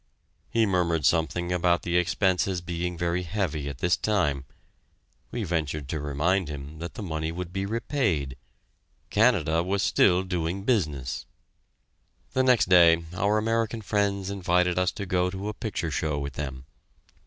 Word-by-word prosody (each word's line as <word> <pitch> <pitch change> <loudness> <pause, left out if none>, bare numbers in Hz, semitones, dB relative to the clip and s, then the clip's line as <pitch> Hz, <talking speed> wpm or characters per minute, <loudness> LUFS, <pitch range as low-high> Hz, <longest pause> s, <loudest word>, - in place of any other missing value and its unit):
He 115 -1 +2
murmured 85 -6 +1
something 85 +3 +1
about 90 -1 +2
the 85 0 -1
expenses 90 +1 +1
being 85 0 -4
very 85 +1 0
heavy 85 -6 -2
at 70 - -7
this 90 +6 +2
time. 75 -11 0 0.8
We 120 - -3
ventured 75 -5 -2
to 80 - -2
remind 80 +5 0
him 75 +1 -7
that 85 +1 -6
the 110 - -6
money 80 -3 -3
would 90 +1 -6
be 95 0 -2
repaid 100 - -1 0.8
Canada 95 -8 +3
was 95 +2 -1
still 90 0 +4
doing 90 0 -2
business! 75 - -1 1.1
The 130 - +3
next 125 -5 +4
day 85 -2 +6
our 100 +4 +1
American 115 0 0
friends 100 -2 0
invited 90 -2 +1
us 90 +1 +2
to 100 - -5
go 90 -1 +1
to 95 +2 -5
a - - -4
picture 100 -7 -3
show 75 -1 -1
with 70 -1 -4
them. 65 -2 -5
90 Hz, 155 wpm, -26 LUFS, 80-100 Hz, 1.1 s, day